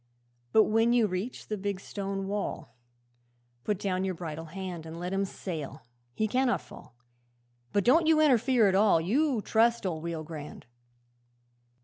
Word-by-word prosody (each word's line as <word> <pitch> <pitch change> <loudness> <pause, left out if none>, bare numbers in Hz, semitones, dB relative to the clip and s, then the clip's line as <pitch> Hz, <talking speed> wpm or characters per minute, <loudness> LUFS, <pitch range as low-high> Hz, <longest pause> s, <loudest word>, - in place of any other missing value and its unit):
'"But 220 - +6
when 225 +2 +2
you 240 -2 +4
reach 200 +5 -4
the 215 -2 -3
big 200 -1 -3
stone 195 0 -4
wall, 200 - -4 0.9
Put 210 - 0
down 185 -1 -1
your 190 -1 -2
bridle 165 -1 -6
hand 180 0 -6
And 160 +1 -8
let 180 +2 -4
him 195 0 +1
sail 160 -7 -6 0.3
he 220 - +1
cannot 250 +2 +1
fall - - -14 0.8
But 200 - +2
don't 315 - +4
you 320 -1 +5
interfere 255 -5 +4
at 190 - +2
all; 195 -3 +4
You 240 - +1
trust 230 0 +2
old 165 -4 -3
Rio 165 -2 -4
Grande." 150 -2 -9
195 Hz, 155 wpm, -29 LUFS, 170-225 Hz, 0.9 s, But